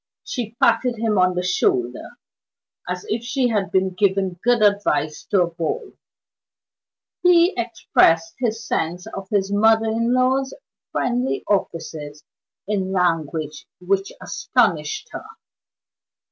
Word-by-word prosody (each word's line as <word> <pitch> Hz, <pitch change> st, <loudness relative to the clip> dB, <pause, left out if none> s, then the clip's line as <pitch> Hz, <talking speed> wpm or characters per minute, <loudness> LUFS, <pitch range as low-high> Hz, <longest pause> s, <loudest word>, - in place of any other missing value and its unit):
She 230 Hz, -3 st, -5 dB
patted 250 Hz, -2 st, +3 dB
him 220 Hz, -3 st, 0 dB
on 185 Hz, 0 st, +3 dB
the 180 Hz, -, -1 dB
shoulder, 125 Hz, -9 st, -1 dB, 0.7 s
as 180 Hz, 0 st, -4 dB
if 225 Hz, +2 st, -1 dB
she 250 Hz, 0 st, 0 dB
had 205 Hz, -4 st, -1 dB
been 190 Hz, 0 st, +1 dB
giving 190 Hz, -2 st, 0 dB
good 240 Hz, -2 st, +3 dB
advice 200 Hz, -7 st, +1 dB
to 195 Hz, -3 st, +4 dB
a -, -, -1 dB
boy. 175 Hz, -, -4 dB, 1.3 s
He 355 Hz, +1 st, +5 dB
expressed 165 Hz, -8 st, +2 dB
his 225 Hz, -3 st, -2 dB
sense 175 Hz, 0 st, -2 dB
of 195 Hz, -1 st, -8 dB
his 200 Hz, -1 st, 0 dB
mother 220 Hz, +2 st, +3 dB
in 230 Hz, +2 st, 0 dB
law's 260 Hz, +1 st, +1 dB, 0.4 s
friendly 245 Hz, +2 st, -1 dB
offices 155 Hz, -6 st, -3 dB, 0.4 s
in 195 Hz, -2 st, -1 dB
language 160 Hz, -4 st, -1 dB
which 195 Hz, +2 st, -1 dB
astonished 435 Hz, -, 0 dB
her. -, -, -7 dB
200 Hz, 120 wpm, -22 LUFS, 180-235 Hz, 1.3 s, He